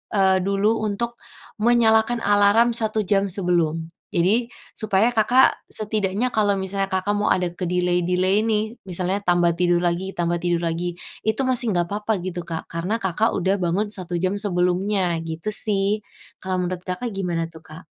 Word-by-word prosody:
eee, 190 -1 +3
dulu 200 +4 +1
untuk 225 +3 -3 0.4
menyalakan 230 0 +3
alarm 205 +3 +4
1 220 -2 +1
jam 195 +1 +1
sebelum. 170 -4 +1 0.2
Jadi 210 +8 +2 0.3
supaya 215 0 +2
Kakak 245 +3 +3
setidaknya 215 +2 0
kalau 205 -2 +2
misalnya 195 +1 -2
Kakak 190 +2 0
mau 205 - 0
ada 180 -1 +1
ke-delay-delay 180 +2 0
nih, 220 +1 -1
misalnya 185 +2 +1
tambah 175 -2 +3
tidur 175 0 +2
lagi 175 +2 -1
tambah 175 0 -1
tidur 175 0 -1
lagi 170 +1 -3 0.3
itu 220 +4 +1
masih 250 -3 +4
nggak 175 - +2
apa-apa 210 +2 -1
gitu, 180 -1 -4
Kak. 165 -1 -4
Karena 170 +6 -2
Kakak 195 +4 +1
udah 190 +2 0
bangun 185 +4 -1
1 180 -4 -3
jam 185 +2 0
sebelumnya 180 -1 +1
gitu 165 +5 -4
sih. 205 0 +2 0.4
Kalau 185 -1 -1
menurut 180 0 -3
Kakak 185 +7 -3
gimana 175 -4 -2
tuh, 160 - -13
Kak? 160 +4 -12
190 Hz, 155 wpm, -22 LUFS, 175-215 Hz, 0.4 s, alarm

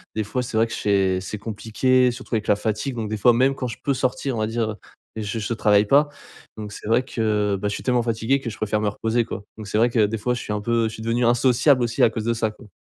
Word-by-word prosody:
des 110 - 0
fois 105 +5 -2
c'est 120 -2 -6
vrai 115 +1 +3
que - - -7
c'est 95 -2 +1
c'est 105 +3 -5
compliqué. 115 +4 +1
Surtout 125 0 -5
avec 110 -1 -2
la 105 - +4
fatigue 110 +5 -2
donc 110 -3 -3
des 110 - -2
fois 120 +3 +5
même 130 +3 +3
quand 125 - -3
je 115 - -6
peux 140 - +1
sortir 130 0 -1
on - - -2
va 110 - 0
dire, 115 0 -1
heu, - - -7 0.4
je 110 +1 -3
je 110 +2 -2
travaille 105 -1 +3
pas 145 +4 +5 0.5
donc 105 -1 -7
c'est 105 - -9
vrai 120 +3 +3
que, 105 -4 0
bah 105 - -2
je 100 - -2
suis - - -6
tellement 125 -2 +2
fatigué 115 +4 0
que 125 -3 -5
je - - -8
préfère 110 0 -1
me 105 - 0
reposer 115 +3 -1
quoi. 100 - -6
Donc 110 -2 -8
c'est 105 - -1
vrai 120 +2 +4
que 115 -3 +3
des 110 +2 -2
fois 125 +3 -1
je 120 - -3
suis 105 - -4
un 105 - -2
peu 115 +1 +1
je 110 - -6
suis - - -9
devenu 115 +1 +1
asocial 125 +2 +3
aussi 115 -1 +1
à - - +6
cause 110 -1 -4
de 115 +1 +1
ça 110 -1 -1
quoi. 110 0 -17
115 Hz, 295 wpm, -23 LUFS, 105-120 Hz, 0.5 s, à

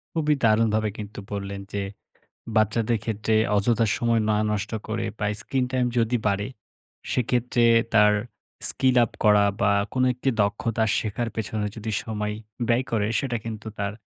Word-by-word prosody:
খুবই 150 -2 +2
দারুণভাবে 110 -1 +3
কিন্তু 105 -1 -7
বললেন 100 -1 -4
যে 100 - -1 0.8
বাচ্চাদের 110 +1 +2
ক্ষেত্রে 110 0 -1 0.2
অযথা 115 +2 +2
সময় 115 -2 +1
না 105 - +3 0.2
নষ্ট 105 0 -2 0.2
করে 110 +1 -2
বা 105 - -1
স্ক্রিন-টাইম 130 -1 0
যদি 115 +2 +2
বাড়ে, 100 +1 0 0.6
সেক্ষেত্রে 120 -1 +1 0.3
তার 105 -1 +6 0.6
স্কিল 130 -1 +2
আপ - - -7
করা 105 -1 +6 0.2
বা 100 +1 +4 0.2
কোন 130 - +1
একটি 125 +2 -3
দক্ষতা 110 +2 0
শেখার 115 +2 -2
পেছনে 110 -1 -2
যদি 110 0 -4
সময় 105 -1 -3 0.3
ব্যয় 120 +2 +2
করে 105 -3 +1
সেটা 125 -4 -1
কিন্তু 110 -1 -6
তার 100 0 -1
110 Hz, 145 wpm, -25 LUFS, 105-120 Hz, 0.8 s, তার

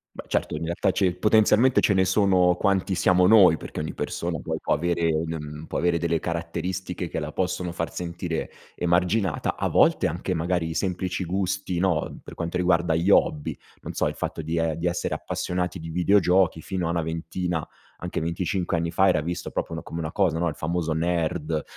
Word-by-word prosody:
Beh - - -8
certo - - -1
in 75 - -4
realtà 85 +1 0
c'è 95 - +1
il 90 0 0
potenzialmente 110 +4 +4
ce 100 - +3
ne 95 - +3
sono 95 -2 +3
quanti 95 -1 +1
siamo 90 0 +4
noi, 95 -6 +7
perché - - -7
ogni 75 - -4
persona - - -3
poi - - -3
può - - 0
avere 85 +1 +1
un, 80 +1 -2
mhmm, 75 +1 -8
può - - -3
avere 85 0 +2
delle 85 0 0
caratteristiche 85 +2 -3
che - - -5
la 75 -1 -4
possono 90 0 -2
far 85 -1 -4
sentire 85 -1 -4 0.2
emarginata 90 +1 +1
a - - -1
volte - - +4
anche 85 +3 -3
magari 85 0 0
i 80 - -4
semplici 95 +1 -2
gusti 95 0 -2
no, 90 -5 0
per - - -9
quanto 85 +1 -3
riguarda 85 -2 +2
gli 85 +4 +1
hobby, 75 -6 +2 0.3
non - - -6
so, - - 0
il - - -7
fatto - - -4
di 80 +2 -3
e 80 -1 0
di 85 - -4
essere 85 0 -1
appassionati 90 0 -3
di 80 - -7
videogiochi 90 -1 +3
fino 90 +1 -3
a - - -2
una 85 0 0
ventina, 80 +1 -3 0.3
anche 90 - -3
25 85 +2 -1
anni 85 0 -1
fa 95 +3 +3
era 90 -5 +3
visto 85 +3 -4
proprio - - -3
n - - -5
come 85 - -7
una 80 -1 -4
cosa 90 -4 +1
no, 85 +1 +1
il 75 - -6
famoso 85 0 -2
nerd 80 -1 -1
85 Hz, 205 wpm, -25 LUFS, 80-90 Hz, 0.3 s, noi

